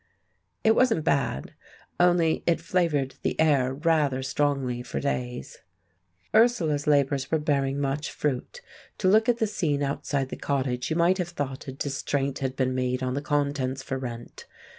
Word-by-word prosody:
It 220 - +5
wasn't 230 -11 +3
bad, 140 - 0 0.5
only 175 -2 +3
it 170 - +3
flavoured 165 -6 0
the - - -2
air 140 -5 +3
rather 150 -4 +1
strongly 135 -3 0
for 125 - -4
days. 125 -3 -3 0.7
Ursula's 175 -11 +3
labours 140 -2 +2
were 160 - +2
bearing 140 -3 0
much 140 +1 -1
fruit. 150 - -3 0.4
To 190 - 0
look 220 +4 +4
at 240 - +3
the 225 - +1
scene 155 -9 -1
outside 140 -1 -2
the - - -6
cottage, 130 -3 -1
you 160 - 0
might 175 +3 +3
have 175 -1 -1
thought 140 -6 -5
a - - -4
distraint 140 0 -2
had 130 -1 -2
been 130 -1 0
made 125 0 -1
on 130 0 -1
the 140 - -2
contents 140 -3 -1
for 135 - -3
rent. 120 -2 -8
140 Hz, 160 wpm, -26 LUFS, 130-165 Hz, 0.7 s, It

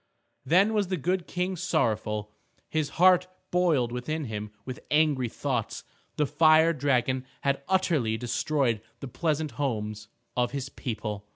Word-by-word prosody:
Then 195 +6 +4
was 205 -3 +1
the 185 0 -1
good 180 +3 -1
King 180 +1 -2
sorrowful. 110 - -1 0.4
His 155 -2 -1
heart 180 +1 +6 0.2
boiled 160 -9 +2
within 150 +6 -3
him 105 -2 -5 0.2
with 130 -1 -6
angry 150 -5 +2
thoughts. 125 -3 -3 0.3
The 150 - +2
fire 155 +2 +5
dragon 130 -3 +1 0.2
had 140 0 0
utterly 160 -12 +2
destroyed 120 -1 0 0.2
the 140 - -6
pleasant 155 +2 -1
homes 110 -5 -2 0.3
of 125 0 0
his 135 -1 -3
people. 105 -5 -5
140 Hz, 135 wpm, -27 LUFS, 120-165 Hz, 0.4 s, heart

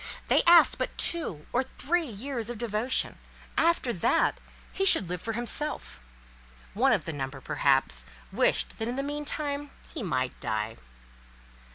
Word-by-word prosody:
They - - +5
asked 345 0 +7
but - - -3
two 195 - +2
or 250 - +3
three 315 +5 -2
years 235 +1 -5
of 240 - -5
devotion—after 240 +5 -1
that, 175 - +1 0.3
he 390 - -1
should 370 - +5
live 180 -1 -4
for 225 - -4
himself: 240 - 0 0.7
one - - +3
of - - +1
the 160 - -4
number, 135 -1 -5
perhaps, - - +1 0.2
wished - - +1
that 225 - -2
in 245 - -3
the 275 - -2
meantime 290 0 -3 0.2
he 315 - -5
might 130 - -2
die. 110 +1 -3
240 Hz, 145 wpm, -28 LUFS, -, 0.7 s, asked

